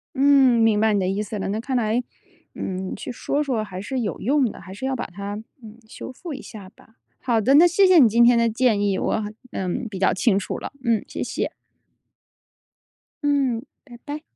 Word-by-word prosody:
嗯， 270 -3 +5
明 220 -2 +3
白 220 0 +3
你 205 - +2
的 185 - 0
意 195 +2 -1
思 210 0 -6
了， 195 - -3
那 215 +2 -2
看 260 +2 -3
来， 235 0 +1 0.5
呃， - - -9 0.3
去 - - -7
说 285 +4 -2
说 250 -7 -1
还 185 -3 -7
是 255 +5 -3
有 220 - -3
用 265 0 +2
的， - - -12
还 190 - -11
是 235 +7 -6
要 265 0 -1
把 245 - -4
它， 200 +3 -7 0.3
呃， 220 - -10 0.2
修 260 - -8
复 315 +4 -8
一 270 - -7
下 200 -4 -11
吧。 - - -23 0.3
好 235 -3 +1
的， 260 +6 +3
那 320 +4 +8
谢 360 +3 +4
谢 365 -2 +6
你 245 - +7
今 235 +2 +4
天 240 0 +6
的 230 0 +3
建 225 -2 +1
议， 200 -2 +1
我， 220 - -1 0.3
呃， 190 - -3 0.2
比 195 - -7
较 190 - +2
清 195 0 +2
楚 200 - -3
了， - - -7
嗯， 230 -3 +1
谢 - - -4
谢。 - - -3 1.7
嗯， 275 -4 +1 0.2
拜 240 -3 -13
拜。 300 +1 -6
235 Hz, 230 characters per minute, -23 LUFS, 210-265 Hz, 1.7 s, 那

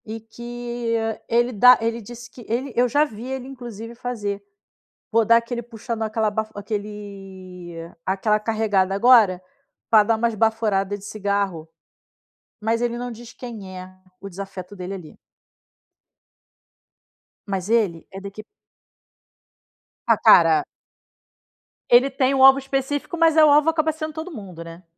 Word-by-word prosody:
E 220 +1 -6
que, 240 +1 -5
ah, 225 -1 -2
ele 240 +1 +2
dá 250 +4 +7
ele 230 +1 -2
disse 240 +3 -11
que 250 - -13
ele 250 +3 -2
eu 245 +1 +3
já 290 +5 +3
vi 225 -4 -9
ele 265 -1 -5
inclusive 235 -4 -9
fazer, 210 -5 -4 0.7
"vou 225 0 +3
dar 230 +1 +6
aquele 235 +1 -3
puxando, 230 0 -5
aquela 220 0 0
baf 220 +1 -2
aquele 195 -4 -7 0.3
aquela 210 +3 +1
carregada 210 -3 0
agora, 210 -5 +5 0.5
pra 215 -2 +6
dar 225 +2 +1
umas 230 +1 0
baforada 215 -3 0
de 195 - -16
cigarro". 200 -6 -2 0.9
Mas 225 +2 0
ele 240 0 -1
não 245 0 -5
diz 230 0 -11
quem 210 -7 -9
é 185 0 -9 0.3
o 200 - -7
desafeto 195 0 -8
dele 185 0 -6
ali. 180 -5 -10 2.3
Mas 195 -1 -3
ele, 205 -8 +1
é 190 - -8
daque 200 +2 -8 1.6
Ah, - - +4
para! 385 -2 +6 1.3
Ele 245 +3 +6
tem 265 0 +1
o 265 -1 +3
alvo 270 0 +8
específico, 275 +5 -3
mas, 325 -1 +3
eh, 315 - +8
o 305 - +7
alvo 300 +2 +5
acaba 315 -1 +1
sendo 310 0 -6
todo 320 +4 -6
mundo, 190 - -9
né. 165 +2 -12
225 Hz, 145 wpm, -22 LUFS, 200-245 Hz, 2.3 s, alvo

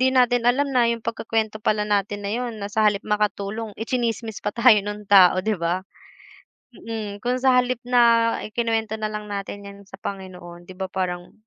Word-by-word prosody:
hindi 260 - +4
natin 245 -2 +3
alam 275 +3 +1
na 240 -2 +3
'yung 230 -1 -2
pagkukuwento 220 -2 -2
pala 210 0 +1
natin 205 0 -1
na 200 - -2
'yon, 240 -1 -3
na 205 0 -6
sa 220 - +1
halip 200 -1 -2
makatulong, 210 +1 -2
itsinismis 230 -2 -2
pa 205 +3 -4
tayo 235 -3 +6
nung 205 +1 -6
tao, 185 -2 +6
'di 220 - +1
ba? 175 +3 -1 0.9
Mm, 215 -3 -6
kung 250 +1 0
sa 260 -1 +4
halip 250 -1 +1
na 235 -2 +4
ikinuwento 225 0 -1
na 215 - -1
lang 210 0 -5
natin 200 0 -6
'yan 200 0 -10
sa - - -11
Panginoon, 180 -3 -8
'di 185 - -11
ba 190 - -3
parang 180 -2 -3
215 Hz, 190 wpm, -23 LUFS, 200-235 Hz, 0.9 s, tayo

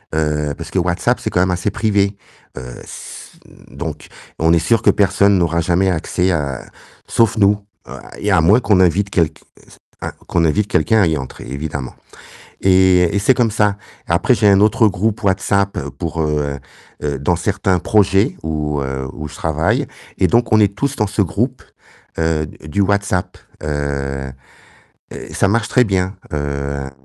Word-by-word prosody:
heu, 75 -2 0
parce 85 -1 -8
que 95 - +1
WhatsApp 90 +7 0
c'est - - -3
quand 90 - +2
même 90 0 +2
assez 90 +3 -1
privé, 100 -2 +1 0.4
heu 65 - -6 0.2
s - - -10 0.4
donc, 75 +3 -7 0.3
on 80 +1 +3
est 85 - +4
sûrs 115 +7 +2
que - - +3
personne 100 0 +3
n'aura 85 -1 +1
jamais 90 +3 +2
accès, 90 +2 0
heu, 70 -5 -2 0.5
sauf 115 -1 +2
nous, 100 0 +4 0.3
heu - - -7 0.2
et - - -1
à 80 - +4
moins 100 +9 +5
qu'on 100 -3 +3
invite 95 +3 +2
quelq 80 -3 0 0.6
un - - -4 0.2
qu'on 85 -1 +1
invite 100 +6 +1
quelqu'un 105 +4 +2
à - - +3
y 80 -2 0
entrer, 65 -2 -8
évidemment 70 -2 -5 0.7
et 95 -1 +4
et - - +3
c'est 125 +6 +4
comme 120 -3 +2
ça. 105 -2 +1 0.3
Après 85 +9 +3
j'ai 105 -2 +3
un 100 0 +5
autre 110 +1 +4
groupe 110 +4 -1
WhatsApp 100 +1 +1 0.2
pour, 80 -1 -3
heu 75 -2 -1 0.5
heu, 70 -2 -1
dans 85 +4 +1
certains 95 0 0
projets 100 +1 +2
où 75 -2 -2
heu, 65 0 -4
où 75 0 -6
je - - -12
travaille, 90 - 0 0.3
et 95 - +4
donc 120 -1 +2
on 110 - +6
est 100 -1 +3
tous 140 +3 -1
dans 105 - +1
ce 105 0 +1
groupe, 120 +8 -2 0.6
heu, 80 -1 0
d 80 - -14
du 100 - -1
WhatsApp, 100 -2 -1 0.3
heu - - -5 1.5
heu, - - -7
et - - -10
ça 105 - +2
marche 110 +2 0
très 125 -1 +4
bien, 95 0 -1 0.2
hem, 70 -1 -3
mmh, 70 - -9
90 Hz, 180 wpm, -18 LUFS, 80-105 Hz, 1.5 s, on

